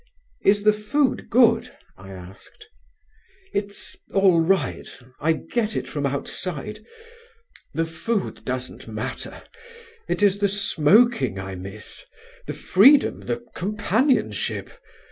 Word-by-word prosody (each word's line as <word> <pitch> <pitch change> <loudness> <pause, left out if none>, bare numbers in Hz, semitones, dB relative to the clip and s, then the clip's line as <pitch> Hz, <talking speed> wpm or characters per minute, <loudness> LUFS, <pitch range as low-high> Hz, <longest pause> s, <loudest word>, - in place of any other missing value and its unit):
"Is 205 +1 +4
the 215 0 +5
food 255 +6 0
good?" 235 0 +4 0.2
I 95 +1 -13
asked. 95 - -12 0.9
"It's 200 0 -4 0.2
all 190 -4 +4
right; 190 +3 0 0.3
I 160 +2 +2
get 220 +6 -2
it - - -2
from 145 -2 -2
outside. 180 +8 -5 0.9
The 165 - +1
food 185 +6 -3
doesn't 130 0 -5
matter. - - -6 0.6
It - - -1
is 200 -1 +4
the 200 -1 +2
smoking 195 - +3
I 95 0 -5
miss, 95 +3 -9 0.4
the - - -3
freedom, 270 +10 +5
the 120 0 -4
companionship. 215 - 0
195 Hz, 110 wpm, -23 LUFS, 140-215 Hz, 0.9 s, the